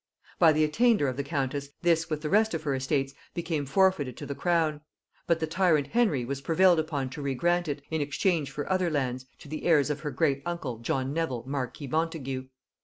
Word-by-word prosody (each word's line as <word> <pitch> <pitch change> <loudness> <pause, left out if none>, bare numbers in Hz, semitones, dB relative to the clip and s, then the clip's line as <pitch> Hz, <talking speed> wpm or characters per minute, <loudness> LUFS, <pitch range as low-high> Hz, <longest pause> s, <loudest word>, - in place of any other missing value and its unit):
By 165 -3 +7
the 155 0 +2
attainder 210 - +3
of 130 - -2
the 140 - -2
countess, 140 -1 -2
this 165 -1 +2
with 155 -1 -2
the 150 - -1
rest 220 -1 +3
of 155 - -4
her 145 -3 0
estates 135 +1 -1 0.2
became 160 -4 -2
forfeited 145 -5 +2
to - - -6
the 140 - -4
crown; 155 0 +1 0.5
but 170 -1 +2
the 160 - 0
tyrant 160 -5 +2
Henry 210 - +2
was 135 +2 -4
prevailed 170 +3 +4
upon 145 -5 -2
to 145 - -6
regrant 170 +6 0
it, 145 -1 -3
in 160 -1 0
exchange 145 +1 0
for 145 - -5
other 185 -2 +1
lands, 130 -4 -2
to - - -14
the 155 +2 -6
heirs 150 -4 +3
of 150 - -3
her 150 - -4
great 140 -3 +1
uncle 150 -9 -4
John 130 +3 -1
Nevil 150 -7 -2
marquis 135 +1 -4
Montagu. 135 -3 -2
150 Hz, 205 wpm, -28 LUFS, 135-170 Hz, 0.5 s, By